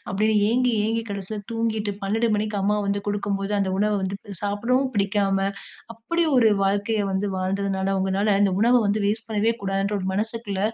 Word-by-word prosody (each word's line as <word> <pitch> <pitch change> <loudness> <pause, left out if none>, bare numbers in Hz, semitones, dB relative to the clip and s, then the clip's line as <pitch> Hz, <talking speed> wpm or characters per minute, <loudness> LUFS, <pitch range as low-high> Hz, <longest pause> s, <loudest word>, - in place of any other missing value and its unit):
அப்படின்னு 215 +3 +1
ஏங்கி 250 +2 +2
ஏங்கி 225 +1 0
கடைசியில 200 +1 -5
தூங்கிட்டு 225 -2 -1
12 220 +4 +1
மணிக்கு 210 0 -2
அம்மா 210 +1 +2
வந்து 200 0 0
குடுக்கும்போது, 200 -1 -2
அந்த 190 -1 0
உணவ 210 +1 +2
வந்து 190 +1 -2 0.3
சாப்பிடவும் 235 +6 0
பிடிக்காம, 200 -1 +1 0.6
அப்படி 335 +10 -1
ஒரு 225 -3 +5
வாழ்க்கைய 205 +3 +1
வந்து 190 +2 0
வாழ்ந்ததுனால 195 +1 -1
உங்கனால 190 +2 0
அந்த 195 -2 +3
உணவ 235 +3 +4
வந்து 205 +1 0
வேஸ்ட் 220 +2 -1
பண்ணவே 220 +2 +1
கூடாதுங்கிற 195 +1 -1
ஒரு 185 - -3
மனசுக்குள்ள 215 -1 -3
205 Hz, 160 wpm, -24 LUFS, 195-225 Hz, 0.6 s, ஒரு